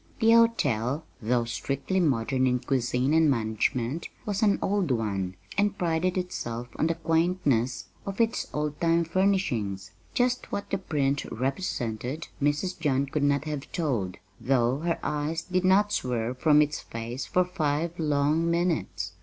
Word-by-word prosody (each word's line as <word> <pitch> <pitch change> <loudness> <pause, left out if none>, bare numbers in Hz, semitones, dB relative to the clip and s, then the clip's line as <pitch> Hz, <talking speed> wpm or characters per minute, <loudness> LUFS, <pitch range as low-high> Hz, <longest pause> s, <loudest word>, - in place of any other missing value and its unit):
The 225 -1 +5
hotel 150 - +3 0.2
though 120 +1 +1
strictly 140 +9 -2
modern 130 -4 +2
in 125 0 +2
cuisine 125 +1 0
and 160 -1 +5
management 115 +4 0 0.2
was 205 0 -1
an 205 -2 +4
old 195 -4 0
one, 100 -6 -1 0.2
and 205 0 +2
prided 175 +2 0
itself 120 -10 -4
on 160 - +2
the 165 - 0
quaintness 160 -7 +1 0.2
of 195 +2 -6
its 230 0 +1
old 150 0 -3
time 170 0 +3
furnishings. 160 - 0 0.2
Just 250 0 +1
what 200 - -4
the 195 - 0
print 145 -6 0
represented 130 - -3
Mrs. 145 +6 0
John 140 -4 +1
could 140 +2 -2
not 140 0 +2
have 150 -3 -5
told, 120 - -1 0.2
though 130 0 +2
her 170 +1 0
eyes 150 +2 -1
did 185 0 0
not 200 +2 +4
swerve 125 0 -1
from 150 0 +6
its 150 +1 -3
face 115 +3 -6
for 180 0 +2
five 165 -1 -1
long 150 +2 +2
minutes. 170 - -1
150 Hz, 150 wpm, -27 LUFS, 125-175 Hz, 0.2 s, from